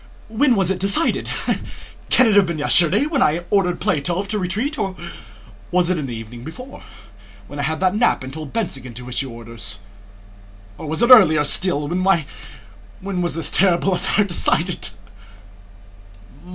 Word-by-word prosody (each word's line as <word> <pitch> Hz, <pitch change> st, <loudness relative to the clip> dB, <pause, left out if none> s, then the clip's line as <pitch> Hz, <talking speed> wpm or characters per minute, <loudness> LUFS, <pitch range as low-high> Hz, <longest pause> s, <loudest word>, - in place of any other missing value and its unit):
When 240 Hz, +3 st, +2 dB
was 190 Hz, -2 st, +1 dB
it 190 Hz, -, -3 dB
decided? 200 Hz, -, 0 dB, 0.8 s
Can 255 Hz, -, +6 dB
it 220 Hz, -, +3 dB
have 200 Hz, -3 st, +5 dB
been 170 Hz, -2 st, -3 dB
yesterday 160 Hz, -, +4 dB
when 300 Hz, -3 st, -1 dB
I 170 Hz, -4 st, +1 dB
ordered 185 Hz, -3 st, +1 dB
Plátov 175 Hz, +4 st, -1 dB
to 210 Hz, 0 st, -2 dB
retreat, 220 Hz, -, -3 dB
or 190 Hz, -1 st, -2 dB, 0.7 s
was 180 Hz, 0 st, +1 dB
it 155 Hz, -6 st, -2 dB
the -, -, -7 dB
evening 115 Hz, +2 st, -9 dB
before, 250 Hz, -, -10 dB, 0.6 s
when 145 Hz, +6 st, -10 dB
I -, -, 0 dB
had 160 Hz, +5 st, -2 dB
a 185 Hz, -, +3 dB
nap 220 Hz, -, +1 dB
and 130 Hz, 0 st, -8 dB
told 155 Hz, -2 st, -8 dB
Bennigsen 135 Hz, -, -4 dB
to 125 Hz, +1 st, -9 dB
issue 130 Hz, +2 st, -3 dB
orders? 115 Hz, -3 st, -2 dB, 1.0 s
Or 155 Hz, -, -7 dB
was 160 Hz, +9 st, -1 dB
it 240 Hz, -, +3 dB
earlier 165 Hz, -11 st, +7 dB
still?... 150 Hz, -1 st, 0 dB
When, 180 Hz, 0 st, +1 dB, 0.8 s
when 190 Hz, -1 st, -3 dB
was 175 Hz, -2 st, -2 dB
this 160 Hz, -3 st, -3 dB
terrible 185 Hz, 0 st, +2 dB
affair 190 Hz, +3 st, +1 dB
decided? 180 Hz, -3 st, -1 dB
175 Hz, 160 wpm, -20 LUFS, 145-200 Hz, 1.0 s, earlier